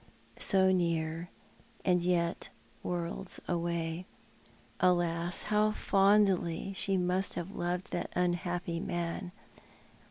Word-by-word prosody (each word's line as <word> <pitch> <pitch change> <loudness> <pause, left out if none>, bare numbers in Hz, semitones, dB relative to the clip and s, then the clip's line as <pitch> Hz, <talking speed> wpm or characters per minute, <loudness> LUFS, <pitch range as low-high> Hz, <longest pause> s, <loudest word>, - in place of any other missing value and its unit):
So 190 -1 +5
near, 170 -1 -1 0.6
and 180 -2 +3
yet 170 -1 -1 0.3
worlds 175 +2 -3
away! 170 0 -3 0.7
Alas, 175 -1 +5
how 210 0 +2
fondly 195 -3 +2
she 195 0 0
mu't 180 +1 0
have 175 +3 -5
loved 180 0 -4
that - - -3
unhappy 175 0 -1
man! 175 +1 -4
175 Hz, 95 wpm, -31 LUFS, 170-190 Hz, 0.7 s, So